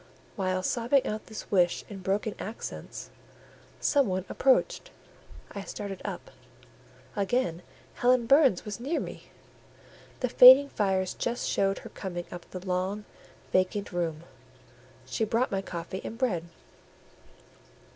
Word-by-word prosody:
While 185 -2 -1
sobbing 240 +6 +2
out 215 0 -4
this 220 - -9
wish 180 -3 +2
in 200 -2 -8
broken 200 +3 -1
accents, 220 +3 -7 0.7
some 280 -3 +3
one 185 -1 -2
approached: 385 - +2 0.6
I 200 - -6
started 200 -1 -6
up—again 200 -4 -5 0.3
Helen 245 -1 +3
Burns 275 - +4
was 210 0 -5
near 280 +8 -1
me; - - -7 1.0
the 250 - +2
fading 260 +3 +9
fires 190 -4 0
just 240 +1 -2
showed 195 0 +1
her - - -7
coming 175 -3 -6
up 175 -1 -9
the 185 0 -8
long, 190 +3 -2 0.5
vacant 185 +2 +1
room; 170 -3 -2 0.8
she 130 +12 -2
brought 230 +4 +1
my 195 -1 0
coffee 185 0 -6
and 225 - -6
bread. 205 -10 0
200 Hz, 125 wpm, -28 LUFS, 185-240 Hz, 1.0 s, fading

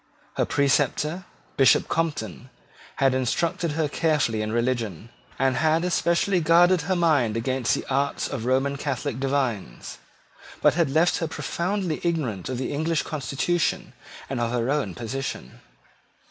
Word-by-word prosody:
Her - - 0
preceptor, 145 +5 +1 0.3
Bishop 135 - +5
Compton, 130 - -3 0.5
had 135 -1 +2
instructed 155 +5 0
her 155 0 0
carefully 145 -8 0
in 110 0 -3
religion, 115 -4 -2 0.3
and 130 -1 +1
had 160 +1 +2
especially 180 +1 +1
guarded 175 +2 +4
her 185 +5 -1
mind 145 -10 +2
against 130 +1 0
the - - -5
arts 140 +1 0
of 125 -5 -5
Roman 135 +2 +1
Catholic 140 -2 -3
divines, 130 - -2 0.6
but - - +4
had 165 -3 +1
left 160 +5 +3
her 165 - -2
profoundly 175 +1 -2
ignorant 140 - -2
of 130 - -3
the 130 - -3
English 160 +2 0
constitution 155 +3 -1 0.3
and 135 -2 -3
of 120 - 0
her 120 +2 0
own 140 -11 -1
position. 120 - -5
140 Hz, 140 wpm, -25 LUFS, 125-165 Hz, 0.6 s, Bishop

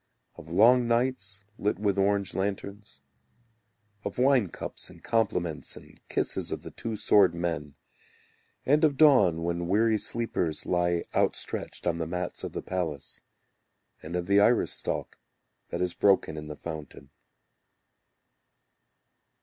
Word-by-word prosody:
Of 80 - -13
long 120 +6 +5
nights 115 -5 -1 0.2
lit 105 -1 0
with 100 -1 0
orange 100 -1 +1
lanterns, 100 -6 -4 1.0
Of 100 - -5
wine 130 -4 +4
cups - - -7
and - - -16
compliments 90 -8 -1
and - - -15
kisses - - -1
of - - -4
the - - -8
two 115 -1 -5
sword 100 -4 +4
men. 85 -4 -3 0.9
And 150 +4 +3
of 145 -3 +3
dawn 105 - +5
when 85 0 -2
weary 110 +3 +3
sleepers 90 -11 -2
Lie 85 -1 +1
outstretched - - -2
on 85 -1 0
the 80 - -2
mats 90 +1 -4
of - - -5
the - - -4
palace, 85 -7 -4 0.8
And 80 +3 -6
of 90 -1 -1
the 100 +2 +4
iris 115 +4 +3
stalk - - -4 0.5
that - - -3
is 90 -1 -1
broken 95 -5 +2
in 75 -1 -7
the 75 - -6
fountain. 75 -3 -8
95 Hz, 135 wpm, -28 LUFS, 85-110 Hz, 1.0 s, long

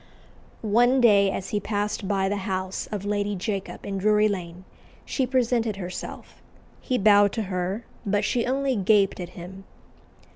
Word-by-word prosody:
One 240 +5 +4
day, 205 -5 +5
as 190 0 -4
he 210 - 0
passed 205 0 -2
by 195 -1 +1
the 205 +1 -1
house 185 0 -3
of 205 -2 -4
Lady 205 0 -1
Jacob 195 0 -4
in 195 -1 -3
Drury 210 +1 +4
Lane, 180 -2 -5 0.4
she 260 -3 -1
presented 240 -4 +1
herself: 185 -2 -8 0.4
he 255 - -1
bowed 205 -2 +5
to 225 - -1
her, 185 +5 -2 0.2
but 205 -1 0
she 240 -1 0
only 270 0 0
gaped 200 -1 +3
at 175 -1 -5
him. 185 +2 -9
205 Hz, 155 wpm, -25 LUFS, 190-225 Hz, 0.4 s, day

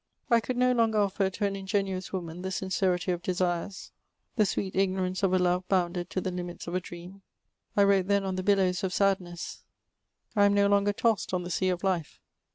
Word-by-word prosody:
I 235 - +6
could 240 +3 -4
no 250 0 +4
longer 230 -3 +2
offer 200 -1 +1
to 205 +2 -2
an 200 -1 -1
ingenuous 190 -1 -2
woman 175 -2 -5
the 190 - -3
sincerity 185 -1 0
of 175 -1 -2
desires, 180 +1 -2 0.4
the 215 -4 +3
sweet 190 -1 -2
ignorance 190 -1 0
of 195 -2 +2
a 185 - +4
lore 180 0 +1
botmded 175 -2 0
to - - -2
the 185 - -2
limits 175 -1 -6
of 170 - -6
a 185 - +1
dream. 175 +3 -10 0.6
I 200 - +6
wrote 195 -2 +3
then 200 -1 +2
on 190 -1 -2
the 185 - -2
billows 185 -2 +2
of 185 -1 -1
sadhess; 185 -3 -1 0.7
I 205 -1 +5
am 200 0 +3
no 200 0 +4
longer 200 0 +3
tossed 210 -2 0
on 180 - -2
the 175 - -6
sea 185 +2 +1
of 180 0 -2
life. 180 -5 -1
190 Hz, 210 wpm, -28 LUFS, 180-200 Hz, 0.7 s, I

